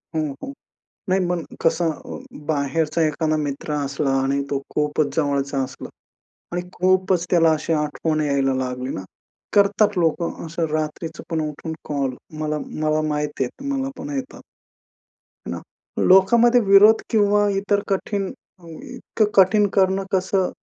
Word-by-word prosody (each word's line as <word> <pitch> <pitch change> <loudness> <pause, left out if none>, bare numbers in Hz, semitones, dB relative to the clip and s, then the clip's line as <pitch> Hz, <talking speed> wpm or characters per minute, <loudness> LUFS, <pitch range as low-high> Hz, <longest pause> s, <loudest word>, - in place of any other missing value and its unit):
हां, 155 -1 0
हां. 275 - -6 0.6
नाही 190 - +3
मग 175 -2 -1 0.2
कसं 165 0 +2
अ, - - -8 0.3
बाहेरचा 155 +2 0
एखादा 155 +1 0
मित्र 145 0 -3
असला 140 0 -1
आणि 140 +1 0
तो 140 -1 -1
खूपच 150 -1 0
जवळचा 140 -2 0
असला - - -8 0.6
आणि 175 - -1
खूपच 185 -1 +2
त्याला 165 -2 +4
अशी 165 - -1
आठवण 155 +1 -1
यायला 140 -2 +1
लागली 125 0 -4
ना, 95 - -5 0.5
करतात 205 0 +3
लोकं 170 0 0
असं 165 +1 -2
रात्रीचं 155 +1 -3
पण 160 -1 -1
उठून 160 +2 -6 0.2
कॉल 140 -3 -1 0.2
मला 155 0 -1
मला 155 0 0
माहितीये, 150 -4 -2 0.2
मला 270 -1 -1
पण 285 - -6
येतात. 265 -1 -6 1.1
ना, - - -4 0.5
लोकामध्ये 235 +6 +6
विरोध 205 +2 +6
किंवा 205 -1 +3
इतर 200 +1 +1
कठीण 195 0 -1 0.3
अ, 170 - -17
इतकं 220 +6 -3
कठीण 205 +2 +5
करणं 190 0 +3
कसं? 190 -1 +1
165 Hz, 135 wpm, -22 LUFS, 150-195 Hz, 1.1 s, लोकामध्ये